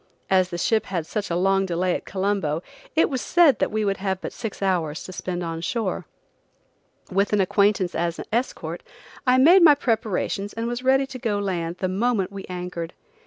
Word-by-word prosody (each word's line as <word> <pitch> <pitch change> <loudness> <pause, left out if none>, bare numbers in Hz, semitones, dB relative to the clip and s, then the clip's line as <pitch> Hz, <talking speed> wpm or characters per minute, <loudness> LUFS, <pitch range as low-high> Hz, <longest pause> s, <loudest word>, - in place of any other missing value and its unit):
As 185 -1 +4
the 175 - -4
ship 220 +5 +1
had 175 -4 -2
such 205 +4 -3
a 170 - -1
long 195 +2 +2
delay 180 +1 0
at - - -4
Colombo, 190 -5 -1 0.3
it 320 - +4
was 260 -4 -3
said 335 -5 +4
that - - +1
we 215 0 -1
would 195 -1 0
have 190 -1 -2
but - - -6
six 225 -3 -6
hours 165 -5 0
to 185 - -9
spend 180 -1 -4
on 165 -1 -4
shore. 210 +2 -2 1.0
With 200 +3 +1
an 210 - +3
acquaintance 195 -1 +2
as 170 0 -2
escort, 240 +3 -2 0.5
I 250 0 +5
made 340 +8 +7
my 310 -4 +8
preparations 215 -5 -1
and 225 0 -3
was 240 +1 -3
ready 265 +1 +4
to 265 -1 -9
go 215 -3 -1
to 200 - -3
land 170 -2 -2
the 185 - -1
moment 200 0 0
we 200 -1 -7
anchored. 180 -2 -5
195 Hz, 200 wpm, -24 LUFS, 180-230 Hz, 1.0 s, my